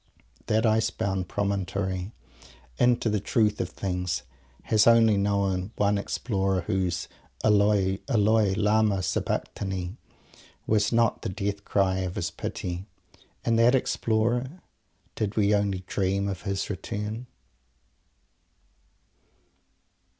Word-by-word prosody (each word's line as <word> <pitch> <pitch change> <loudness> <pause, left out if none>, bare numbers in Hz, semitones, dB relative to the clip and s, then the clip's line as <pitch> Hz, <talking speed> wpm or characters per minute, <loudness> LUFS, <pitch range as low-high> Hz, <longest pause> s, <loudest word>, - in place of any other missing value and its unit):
That 110 +2 +2
ice 110 0 +3
bound 95 -4 -2
Promontory 100 -1 -2 0.7
into 120 -1 +3
the 105 -1 +1
Truth 105 +1 +1
of - - -3
Things 90 -3 -3 0.4
has 110 0 +3
only 115 -2 +6
known 100 0 0
one 100 0 +2
Explorer 95 -3 -1
whose 95 -2 -1 0.4
"Eloi, 100 -2 +3
Eloi 110 -4 +3
Lama 105 -2 +2
Sabachthani" 95 +2 -2 0.7
was 105 -1 +2
not 115 -1 +2
the - - -3
death 100 0 -3
cry 95 -2 +1
of 95 -1 -3
his - - -2
Pity. 90 +2 -5 0.6
And 115 0 +2
that 120 +3 +5
Explorer 120 +6 0 0.5
did 110 0 -3
we 105 -1 +3
only 100 -2 0
dream 100 +1 0
of 95 -2 -4
his 100 0 -1
Return? 105 +5 -5
100 Hz, 110 wpm, -27 LUFS, 95-110 Hz, 0.7 s, only